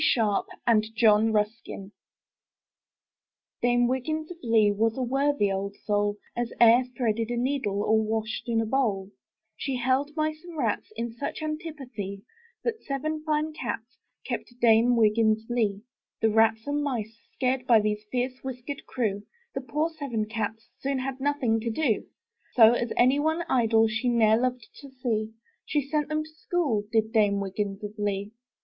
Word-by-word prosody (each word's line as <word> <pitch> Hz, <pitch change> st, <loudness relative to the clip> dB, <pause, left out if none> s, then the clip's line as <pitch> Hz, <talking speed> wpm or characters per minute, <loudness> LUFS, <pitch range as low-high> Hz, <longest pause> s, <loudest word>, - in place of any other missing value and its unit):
Sharpe 215 Hz, -4 st, +2 dB, 0.2 s
and 220 Hz, -2 st, +4 dB
John 220 Hz, 0 st, +5 dB
Ruskin 210 Hz, -2 st, -2 dB, 1.7 s
Dame 245 Hz, 0 st, +3 dB
Wiggins 310 Hz, +6 st, -2 dB
of 350 Hz, -, -8 dB
Lee 220 Hz, -3 st, +4 dB
Was 225 Hz, +3 st, +1 dB
a 260 Hz, -, 0 dB
worthy 270 Hz, -4 st, +1 dB
old 200 Hz, +1 st, -3 dB
soul, 205 Hz, 0 st, +1 dB, 0.2 s
As 240 Hz, -1 st, -2 dB
e*er 235 Hz, +1 st, +7 dB, 0.2 s
threaded 230 Hz, -2 st, 0 dB
a 240 Hz, -, -2 dB
nee 265 Hz, +4 st, 0 dB
dle, 205 Hz, -4 st, -1 dB
or 220 Hz, +1 st, +3 dB
washed 220 Hz, +2 st, -3 dB
in 230 Hz, -1 st, +2 dB
a -, -, -1 dB
bowl; 215 Hz, -6 st, 0 dB, 0.4 s
She 270 Hz, -2 st, -3 dB
held 260 Hz, +4 st, 0 dB
mice 310 Hz, 0 st, -1 dB
and 345 Hz, -2 st, -10 dB
rats 230 Hz, -7 st, -1 dB
In 230 Hz, +1 st, -3 dB
such 280 Hz, +5 st, -5 dB
antipathie, 270 Hz, -, -5 dB, 0.4 s
That 455 Hz, -2 st, -2 dB
seven 305 Hz, +3 st, -3 dB
fine 310 Hz, 0 st, 0 dB
cats 235 Hz, -3 st, -5 dB, 0.3 s
Kept 240 Hz, 0 st, -5 dB
Dame 235 Hz, +1 st, +5 dB
Wiggins 220 Hz, -1 st, +3 dB
of 225 Hz, -, -10 dB
Lee. 210 Hz, -4 st, 0 dB, 0.4 s
The 220 Hz, -1 st, +2 dB
rats 225 Hz, 0 st, +3 dB
and 290 Hz, +1 st, -1 dB
mice 225 Hz, -6 st, -3 dB, 0.2 s
scared 255 Hz, -1 st, 0 dB
By 230 Hz, -2 st, +7 dB
this 210 Hz, 0 st, -1 dB
fierce 255 Hz, +1 st, -2 dB
whiskered 265 Hz, +2 st, -6 dB
crew, 210 Hz, -5 st, -1 dB, 0.3 s
The -, -, -3 dB
poor 300 Hz, +5 st, -1 dB
seven 275 Hz, -9 st, -3 dB
cats 225 Hz, +1 st, -4 dB
Soon 275 Hz, 0 st, -1 dB
had 260 Hz, 0 st, -3 dB
nothing 265 Hz, -5 st, +1 dB
to 230 Hz, +1 st, -3 dB
do; 230 Hz, -2 st, 0 dB, 0.5 s
So, 225 Hz, -3 st, +8 dB
as 240 Hz, -1 st, -1 dB
any 255 Hz, +4 st, +4 dB
one 315 Hz, +3 st, +1 dB
idle 225 Hz, -3 st, +3 dB
She 225 Hz, +3 st, -1 dB
ne'er 220 Hz, -2 st, +4 dB
loved 250 Hz, -1 st, -1 dB
to 280 Hz, -, -11 dB
see, 225 Hz, -4 st, -2 dB, 0.3 s
She 300 Hz, -, 0 dB
sent 300 Hz, 0 st, -1 dB
them 310 Hz, 0 st, 0 dB
to 310 Hz, -, -13 dB
school. 310 Hz, -10 st, -1 dB
Did 220 Hz, -1 st, +1 dB
Dame 205 Hz, -3 st, +3 dB
Wiggins 200 Hz, +1 st, -3 dB
of 210 Hz, 0 st, -5 dB
Lee. 200 Hz, 0 st, -2 dB
235 Hz, 170 wpm, -27 LUFS, 215-270 Hz, 1.7 s, So